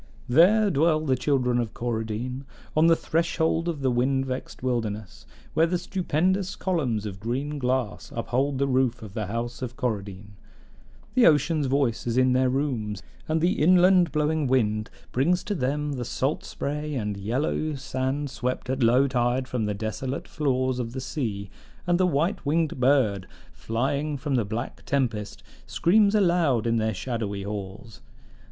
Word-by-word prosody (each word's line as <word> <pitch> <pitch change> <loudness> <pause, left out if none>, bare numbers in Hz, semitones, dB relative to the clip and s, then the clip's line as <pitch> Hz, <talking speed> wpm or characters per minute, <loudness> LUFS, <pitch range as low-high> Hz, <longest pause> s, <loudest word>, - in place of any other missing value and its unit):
There 195 - +5
dwell 155 +1 +3
the 135 -4 +1
children 125 -2 +1
of 115 -3 -3
Coradine, 120 +2 -3 0.3
on 155 +2 +5
the 165 - +6
threshold 165 0 0
of 160 -5 -2
the 130 -1 +2
wind 130 +2 +1
vexed 130 -1 -6
wilderness, 110 -5 -3 0.3
where 165 +1 +4
the 180 +1 0
stupendous 185 +1 0
columns 130 - -1
of 95 -2 -6
green 135 +7 -3
glass 125 -4 -2
uphold 130 +4 0
the 140 - +1
roof 130 -3 +1
of 105 -3 -9
the 105 -2 -3
House 120 +4 -4
of 125 -1 -5
Coradine; 105 -6 -4 0.8
the 255 -2 +6
ocean's 150 -1 +3
voice 130 -4 0
is 120 +1 0
in 130 0 +4
their 130 0 +3
rooms, 120 -7 -2 0.3
and 160 0 +1
the 175 0 +1
inland 180 +1 +5
blowing 150 -1 +1
wind 110 -4 +1 0.2
brings 170 +8 +1
to 205 - -2
them 145 -1 -1
the 125 -3 -3
salt 135 +4 -1
spray 150 +1 -4
and 105 -5 -2
yellow 130 +9 -1
sand 135 +1 -2
swept 125 -1 -3
at 130 0 -2
low 125 +4 +4
tide 125 0 0
from 125 -4 -2
the 105 -1 -2
desolate 110 +6 -4
floors 130 -3 0
of 115 -1 -4
the 130 - -4
sea, 110 -8 -3 0.4
and 175 0 +2
the 185 - +4
white 170 +5 0
winged 155 -1 0
bird 125 -8 +2 0.3
flying 140 +6 -2
from 140 +1 -3
the 120 -5 +2
black 115 +4 -5
tempest 115 -7 -1 0.2
screams 205 +3 +3
aloud 170 - +3
in 115 0 +2
their 110 0 +1
shadowy 105 -2 -3
halls. 100 +1 -7
130 Hz, 160 wpm, -26 LUFS, 115-150 Hz, 0.8 s, the